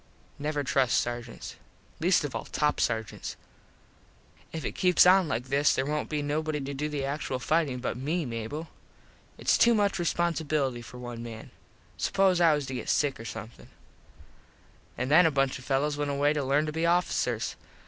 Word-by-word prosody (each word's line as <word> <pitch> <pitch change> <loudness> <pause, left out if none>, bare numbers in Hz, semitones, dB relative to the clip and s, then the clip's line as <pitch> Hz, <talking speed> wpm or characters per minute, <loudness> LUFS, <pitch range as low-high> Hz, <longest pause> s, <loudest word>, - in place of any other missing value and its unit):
Never 150 0 -1
trust 130 -2 +2
sargents. 120 -1 -5 0.4
Least 175 +1 +3
of 145 - -4
all - - -4
top 150 -1 0
sargents. 110 -1 -2 1.2
If 160 -2 -5
it - - -1
keeps 180 -1 +4
on 185 -1 +6
like 125 0 -3
this 140 +2 +3
there 130 - 0
wont 150 +1 -2
be 150 -2 -1
nobody 150 +1 -1
to 140 0 -5
do 150 +2 -2
the 145 -2 -2
actual 140 -2 -2
fightin 145 0 0
but 125 -1 -3
me, 155 +6 -1
Mable. 120 +7 -5 0.7
Its - - +2
too 235 0 +6
much 205 -3 +1
responsibilety 155 -7 0
for 125 - -11
one 120 -1 -7
man. 115 -1 -8 0.5
Suppose 190 -2 +2
I 165 -3 +6
was 145 -2 -3
to 130 - -6
get 125 - -4
sick 145 -5 +1
or 115 - -8
somethin. 115 +1 -8 1.3
An 125 +2 -2
then 165 +3 +7
a - - +4
bunch 135 -3 0
of 125 - -13
fellos 145 +2 0
went 145 -1 -1
away 145 +1 +2
to 150 -2 -1
lern 140 +3 +2
to 155 - -3
be 165 +2 0
officers. 175 +1 0
145 Hz, 180 wpm, -28 LUFS, 130-160 Hz, 1.3 s, then